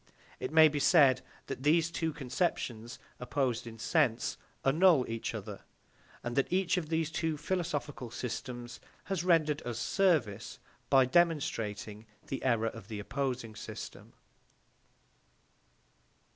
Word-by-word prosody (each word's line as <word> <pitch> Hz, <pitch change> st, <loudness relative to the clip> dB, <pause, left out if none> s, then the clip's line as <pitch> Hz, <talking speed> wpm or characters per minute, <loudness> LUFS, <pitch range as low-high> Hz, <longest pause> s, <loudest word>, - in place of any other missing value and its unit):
It 130 Hz, -, -4 dB
may 160 Hz, 0 st, +8 dB
be 150 Hz, -1 st, -1 dB
said 140 Hz, -5 st, +5 dB, 0.2 s
that -, -, -6 dB
these 165 Hz, +4 st, +3 dB
two 165 Hz, -1 st, -1 dB
conceptions, 125 Hz, -5 st, -2 dB, 0.2 s
opposed 125 Hz, -2 st, -1 dB
in 115 Hz, -1 st, -9 dB
sense, 120 Hz, 0 st, +1 dB, 0.3 s
annul 155 Hz, -1 st, +5 dB
each 115 Hz, 0 st, -4 dB
other, -, -, -7 dB, 0.6 s
and 120 Hz, 0 st, -3 dB
that 135 Hz, -, +1 dB
each 185 Hz, -1 st, +2 dB
of 170 Hz, -4 st, -3 dB
these 160 Hz, -1 st, 0 dB
two 160 Hz, -1 st, -1 dB
philosophical 150 Hz, -6 st, -3 dB
systems 120 Hz, 0 st, -6 dB, 0.2 s
has 190 Hz, -4 st, -2 dB
rendered 155 Hz, -4 st, +3 dB
us 120 Hz, -2 st, -5 dB
service 150 Hz, -, +1 dB, 0.3 s
by 135 Hz, -1 st, +6 dB
demonstrating 115 Hz, -9 st, 0 dB, 0.2 s
the 135 Hz, -, -5 dB
error 115 Hz, -3 st, +2 dB
of 115 Hz, -3 st, -11 dB
the 110 Hz, -2 st, -5 dB
opposing 125 Hz, 0 st, -3 dB
system. -, -, -8 dB
135 Hz, 125 wpm, -31 LUFS, 120-160 Hz, 0.6 s, may